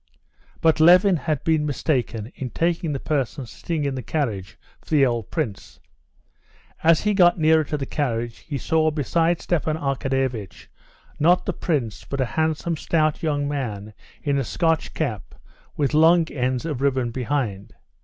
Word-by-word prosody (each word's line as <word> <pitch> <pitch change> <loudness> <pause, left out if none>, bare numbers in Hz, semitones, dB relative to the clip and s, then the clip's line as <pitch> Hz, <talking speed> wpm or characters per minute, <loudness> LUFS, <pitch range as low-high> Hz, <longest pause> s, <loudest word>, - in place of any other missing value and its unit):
But 160 -1 +3
Levin 180 +4 +6
had 155 -3 -2
been 160 -2 +2
mistaken 125 -6 -2
in 130 - -5
taking 165 +2 -1
the 140 - -2
person 140 -2 -2
sitting 155 +6 -4
in 140 - -1
the 130 - -4
carriage 110 - -3 0.2
for - - -20
the 145 -3 +4
old 120 -4 -2
prince. 135 - -4 1.0
As 165 0 +5
he 210 0 +1
got 175 -3 +5
nearer 160 -1 +4
to 150 - -3
the 140 - -3
carriage 120 -5 -2
he 145 - -5
saw 160 +4 +1
beside 165 +3 0
Stepan 160 -2 0
Arkadyevitch 135 - -2 0.5
not 175 +4 +4
the - - -1
prince 130 - -2
but 140 - -5
a 130 - +2
handsome, 160 +1 0
stout 155 0 0
young 145 -3 0
man 110 -8 -4 0.3
in 140 -1 +1
a - - 0
Scotch 165 - 0
cap, 120 - -3 0.4
with 145 0 0
long 165 +2 +5
ends 130 0 -1
of 150 -6 -3
ribbon 130 -4 +1
behind. 120 -6 -3
145 Hz, 160 wpm, -23 LUFS, 125-160 Hz, 1.0 s, Levin